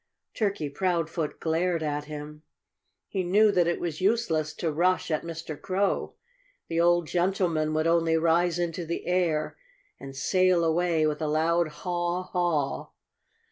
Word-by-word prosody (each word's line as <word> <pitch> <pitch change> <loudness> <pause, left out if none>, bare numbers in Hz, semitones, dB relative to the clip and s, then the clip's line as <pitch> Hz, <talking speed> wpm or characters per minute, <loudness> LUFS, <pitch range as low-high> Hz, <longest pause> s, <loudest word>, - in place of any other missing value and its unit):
Turkey 200 -8 -1
Proudfoot 165 0 -2
glared 165 +1 0
at 150 -1 -2
him. 150 0 -8 0.7
He 195 - -2
knew 205 +4 +4
that 175 -3 +2
it 170 - 0
was 165 -2 -4
useless 185 -8 +1
to 165 - -2
rush 180 +3 +1
at 155 - +1
Mr. 165 -2 -7
Crow. 195 +1 -1 0.5
The 165 0 +1
old 175 0 +3
gentleman 175 -3 0
would 155 0 +1
only 165 -1 +3
rise 170 +1 +2
into 175 0 -2
the 170 +1 -4
air 175 - 0 0.4
and 135 0 -9
sail 185 +4 +2
away 165 -1 +2
with 150 0 -1
a 155 - 0
loud 165 +2 +2
haw 175 +2 -2
haw. 175 -7 -1
170 Hz, 145 wpm, -27 LUFS, 155-180 Hz, 0.7 s, knew